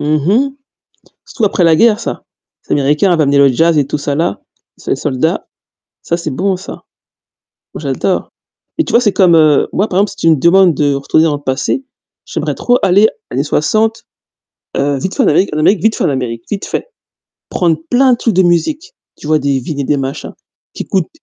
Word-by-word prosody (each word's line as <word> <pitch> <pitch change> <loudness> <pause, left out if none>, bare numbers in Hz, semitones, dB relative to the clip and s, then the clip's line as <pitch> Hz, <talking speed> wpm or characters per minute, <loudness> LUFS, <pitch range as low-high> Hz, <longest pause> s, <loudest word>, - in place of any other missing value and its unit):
Mmh 150 +1 0
mh. 210 - +1 0.8
Surtout 225 -5 -2
après 190 -2 +1
la 165 -1 +5
guerre, 220 +4 +3
ça. - - -5 0.5
Les - - +1
Américains 150 +7 +2
avaient 160 -3 +2
amené 140 0 +2
le 140 0 +6
jazz 165 +5 +2
et 145 - +2
tout 150 - -3
ça 140 0 -2
là, 150 -11 -2 0.4
ces - - -3
soldats, 150 +6 -2 0.5
ça 170 - -2
c'est 160 -4 -5
bon 190 +6 -1
ça. 190 - -10 0.9
Moi - - -7
j'adore. - - -2 0.5
Et 320 - +2
tu - - -6
vois, 235 - +5
c'est 210 -5 +1
comme, 180 -4 +4
heu, 155 -3 +4
moi 205 +3 0
par 185 - -1
exemple, 205 0 +2
si 200 - -12
tu 165 - +2
me 160 - +4
demandes 175 +3 +4
de 145 0 +1
retourner 140 +3 +1
dans 150 -3 +1
le 145 - -12
passé, 135 - -2 0.4
j'aimerais - - -3
trop 245 0 +1
aller 200 +4 +4 0.2
années 135 +3 -1
60 220 +10 0 0.7
vite 140 +6 -1
fait - - +2
en - - +2
Amérique 160 +3 +2
vite 220 0 +2
fait - - -2
en - - +2
Amérique, 120 -4 -3
vite 200 -1 -4
fait. - - -4 0.6
Prendre 165 -3 +1
plein 255 0 +4
de - - 0
trucs 230 -3 -1
de 190 - +3
musique, 295 - 0 0.2
tu 150 - -11
vois 155 0 +2
des 140 -1 0
vinyles 140 +3 -5
et - - -3
des 145 - 0
machins 135 0 -5 0.4
qui - - -6
coûtent, 185 -4 -1
165 Hz, 205 wpm, -14 LUFS, 145-200 Hz, 0.9 s, le